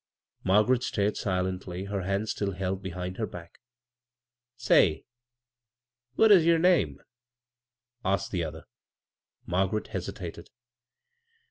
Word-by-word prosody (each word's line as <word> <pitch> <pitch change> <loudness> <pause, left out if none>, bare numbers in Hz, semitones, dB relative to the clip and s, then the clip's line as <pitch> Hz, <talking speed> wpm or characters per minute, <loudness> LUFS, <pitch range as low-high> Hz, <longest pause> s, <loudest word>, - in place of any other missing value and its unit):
Margaret 105 +6 +3
stared 105 -5 0
silendy, 95 -1 -3
her 100 -1 -2
hands 100 +3 -1
still 100 -1 -2
held 95 +1 -3
behind 90 -1 -5
her 110 - -2
back. 85 -1 -11 1.0
"Say, 100 -9 +3 1.1
what 220 +6 +5
is 185 -5 +8
yer 165 0 +4
name?" 160 - +2 1.0
asked 95 0 0
the 90 -3 -1
other. 80 -1 -6 0.8
Margaret 95 +4 -1
hesitated. - - -6
95 Hz, 105 wpm, -28 LUFS, 90-110 Hz, 1.1 s, is